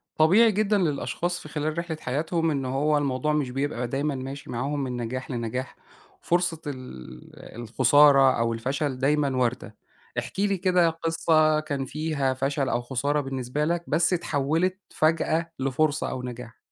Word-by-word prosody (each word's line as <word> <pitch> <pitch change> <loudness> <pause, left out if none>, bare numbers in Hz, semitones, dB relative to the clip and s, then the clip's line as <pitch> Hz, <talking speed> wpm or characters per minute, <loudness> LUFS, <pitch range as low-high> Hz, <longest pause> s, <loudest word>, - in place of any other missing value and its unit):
طبيعي 200 +9 +5
جدًا 210 0 +1
للأشخاص 175 +1 -1
في 155 - -11
خلال 155 +1 -3
رحلة 170 -2 -3
حياتهم 160 +4 -1
إنّه 135 -3 -2
هو 150 +2 +2
الموضوع 145 +1 0
مش 145 -4 0
بيبقى 135 -2 -2
دايمًا 140 +3 -1
ماشي 135 +2 -7
معاهم 140 +4 -2
من 125 -2 -3
نجاح 130 +3 -4
لنجاح، 125 +2 -4 0.5
فرصة 175 -2 0
ال 125 - -9 0.3
الخسارة 135 +3 +5
أو 115 0 +1
الفشل 135 +4 -2
دايمًا 140 -1 +1
واردة، 120 -3 -1 0.4
احكِ 190 - -7
لي 200 -1 +2
كده 180 -2 +3
قصّة 160 -1 +2
كان 145 -3 -3
فيها 150 -2 -1
فشل 135 +1 -1
أو 120 - 0
خسارة 140 +4 -1
بالنسبة 135 +1 -2
لك 170 +1 -1
بس 170 +2 +2
اتحولت 165 +2 0
فجأة 165 +1 +1
لفرصة 140 +3 0
أو 125 - -5
نجاح. 125 -2 -8
145 Hz, 150 wpm, -26 LUFS, 130-160 Hz, 0.5 s, طبيعي